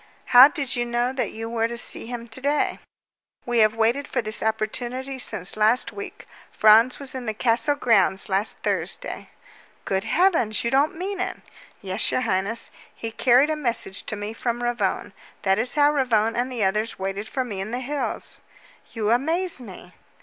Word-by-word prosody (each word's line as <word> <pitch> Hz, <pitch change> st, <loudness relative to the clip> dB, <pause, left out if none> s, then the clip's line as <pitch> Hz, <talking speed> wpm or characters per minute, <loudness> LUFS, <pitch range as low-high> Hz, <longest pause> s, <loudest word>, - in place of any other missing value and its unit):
"How 250 Hz, +2 st, +11 dB
did 285 Hz, -5 st, -2 dB
you 240 Hz, -, 0 dB
know 240 Hz, +1 st, -1 dB
that 260 Hz, -, -2 dB
you 225 Hz, +1 st, -6 dB
were 230 Hz, 0 st, 0 dB
to 235 Hz, 0 st, -6 dB
see 235 Hz, -, +2 dB
him 240 Hz, -1 st, -6 dB
to 225 Hz, +4 st, -5 dB
day?" 290 Hz, +2 st, 0 dB, 0.7 s
"We 240 Hz, -1 st, 0 dB
have 215 Hz, 0 st, +4 dB
waited 235 Hz, +6 st, +1 dB
for 255 Hz, -, -2 dB
this 215 Hz, -2 st, -2 dB
opportunity 240 Hz, +5 st, -3 dB
since 195 Hz, -6 st, -3 dB
last 215 Hz, +3 st, +2 dB
week. 405 Hz, 0 st, -9 dB, 0.3 s
Franz 220 Hz, +4 st, +5 dB
was 275 Hz, -2 st, -3 dB
in 255 Hz, -3 st, -6 dB
the 220 Hz, -, -2 dB
castle 235 Hz, +5 st, +2 dB
grounds 200 Hz, -8 st, +3 dB
last 195 Hz, +2 st, 0 dB
Thursday." -, -, -3 dB, 0.6 s
"Good 190 Hz, 0 st, -1 dB
heavens! 330 Hz, -, +2 dB
You 235 Hz, -, -1 dB
don't 280 Hz, +3 st, +2 dB
mean 385 Hz, +2 st, -4 dB
it!" -, -, -3 dB, 0.5 s
"Yes, 190 Hz, +2 st, -1 dB
your -, -, 0 dB
highness. 225 Hz, 0 st, -1 dB, 0.2 s
He 225 Hz, -, -6 dB
carried 255 Hz, +6 st, +3 dB
a -, -, 0 dB
message 235 Hz, -9 st, 0 dB
to -, -, -2 dB
me 205 Hz, +1 st, -5 dB
from 240 Hz, +1 st, -3 dB
Ravone. 235 Hz, -5 st, -2 dB, 0.3 s
That 195 Hz, +1 st, +2 dB
is 245 Hz, +4 st, +3 dB
why 290 Hz, -1 st, +4 dB
Ravone 230 Hz, -6 st, +1 dB
and 250 Hz, +2 st, -1 dB
the 235 Hz, -4 st, -2 dB
others 210 Hz, +3 st, 0 dB
waited 195 Hz, +2 st, -4 dB
for 260 Hz, -, -2 dB
me 205 Hz, -6 st, -5 dB
in 195 Hz, -, -5 dB
the 240 Hz, -, -3 dB
hills." 280 Hz, +3 st, -1 dB, 0.5 s
"You 220 Hz, -2 st, -1 dB
amaze 325 Hz, +7 st, 0 dB
me!" 185 Hz, -5 st, -12 dB
235 Hz, 185 wpm, -23 LUFS, 215-260 Hz, 0.7 s, How